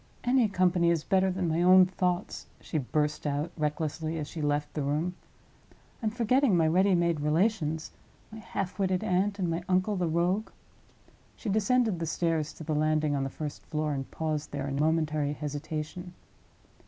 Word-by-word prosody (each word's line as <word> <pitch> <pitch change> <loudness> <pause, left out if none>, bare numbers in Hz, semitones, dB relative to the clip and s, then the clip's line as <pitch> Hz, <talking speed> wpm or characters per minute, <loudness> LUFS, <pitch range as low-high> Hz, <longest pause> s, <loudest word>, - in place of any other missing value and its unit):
"Any 245 -3 +3
company 180 -3 +2
is 165 -3 +1
better 190 -1 +2
than 185 -1 -1
my 165 +1 +1
own 185 +1 +7
thoughts," 180 -1 -2
she 155 - -3
burst 150 +3 -1
out, 145 +4 -1
recklessly, 155 +1 -2
as 150 -2 -4
she 160 - -6
left 145 0 -1
the 150 - -2
room. 150 +6 -1 0.9
"I'm 220 - +1
forgetting 235 -1 +2
my 160 -1 +3
ready 185 +4 +4
made 170 -2 +1
relations—my 160 +5 -2
half 195 -3 -4
witted 185 -2 +1
aunt, 195 +3 +1
and 185 -3 -1
my 165 +1 -2
uncle 185 +3 +2
the 180 -2 0
rogue." 175 +6 0 0.9
She 225 - -5
descended 220 -1 +2
the 165 - -2
stairs 165 -2 0
to - - -10
the 155 0 -2
landing 155 -1 +1
on 135 - 0
the 135 - -2
first 150 +1 -6
floor, 155 -1 -1
and 135 -1 -4
paused 155 -2 -3
there 140 -1 -3
in 140 0 -3
momentary 155 -1 +1
hesitation. 155 +4 -5
165 Hz, 170 wpm, -29 LUFS, 150-185 Hz, 0.9 s, own